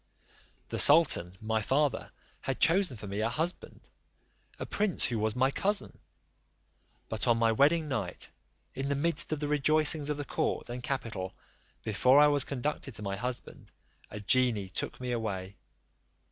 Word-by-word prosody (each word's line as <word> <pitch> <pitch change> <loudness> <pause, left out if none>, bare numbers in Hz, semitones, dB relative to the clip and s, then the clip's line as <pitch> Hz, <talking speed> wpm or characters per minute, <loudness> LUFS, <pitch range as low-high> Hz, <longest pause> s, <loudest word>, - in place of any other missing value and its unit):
"The - - -3
sultan, 135 - +6
my 110 0 -1
father, 135 +4 0 0.3
had 135 - -4
chosen 175 - +2
for 105 - -9
me 100 +1 -5
a 110 +1 0
husband, 165 +8 -4 0.8
a - - -5
prince 205 -4 -1
who 115 -3 -2
was 110 0 0
my 130 +2 +2
cousin; 205 +7 -1 1.1
but - - -3
on 120 -1 +3
my 115 0 +2
wedding 150 +7 +2
night, 105 -10 -4 0.4
in 135 +1 -4
the 140 - 0
midst 165 +4 0
of 155 - -2
the 150 - -2
rejoicings 150 +1 +2
of 150 - -2
the 145 - -5
court - - -2
and 125 +1 -6
capital, 115 -9 -4 0.5
before 125 +5 +3
I 150 - +7
was 145 -2 +3
conducted 140 -1 -4
to 105 - -6
my 100 -1 -3
husband, 125 +4 -6 0.4
a 105 - -8
genie 110 -2 +1
took - - -4
me 125 -1 -4
away. 100 -5 -4
130 Hz, 160 wpm, -29 LUFS, 110-150 Hz, 1.1 s, I